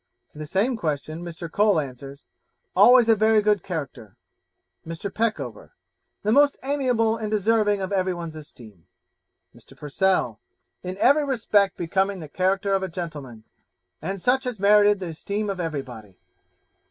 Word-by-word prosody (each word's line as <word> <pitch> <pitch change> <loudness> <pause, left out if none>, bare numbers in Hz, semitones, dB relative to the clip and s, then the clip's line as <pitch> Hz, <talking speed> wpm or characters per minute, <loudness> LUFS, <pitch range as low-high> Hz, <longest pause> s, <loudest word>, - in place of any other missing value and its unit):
To - - -13
the 155 - -6
same 220 - 0
question, 155 -2 -4
Mr. 170 0 -7
Cole 205 +1 +2
answers, 140 0 -8 0.5
'Always 245 -1 +6
a 225 - +5
very 220 +1 +3
good 210 -2 +2
character.' 140 - -7 0.7
Mr. 165 +4 -6
Peckover 225 0 -3 0.5
'The 210 - +1
most 285 +3 +4
amiable, 250 -5 +1
and 215 -2 -4
deserving 210 -1 +1
of 190 - -4
every 185 -2 0
one's 165 -2 -7
esteem.' 115 - -14 0.7
Mr. - - -18
Purcell 150 - 0 0.4
'In 185 +1 -6
every 285 +7 +4
respect 210 -7 +1
becoming 190 +3 -1
the 155 - -8
character 190 +5 0
of 195 - +1
a 190 - -2
gentleman, 150 -10 -7 0.6
and 190 +5 -4
such 255 +6 +1
as 240 -5 -4
merited 205 0 +4
the 180 -3 -5
esteem 200 +6 -3
of 190 - -6
everybody.' 130 - -6
190 Hz, 150 wpm, -24 LUFS, 155-215 Hz, 0.7 s, Always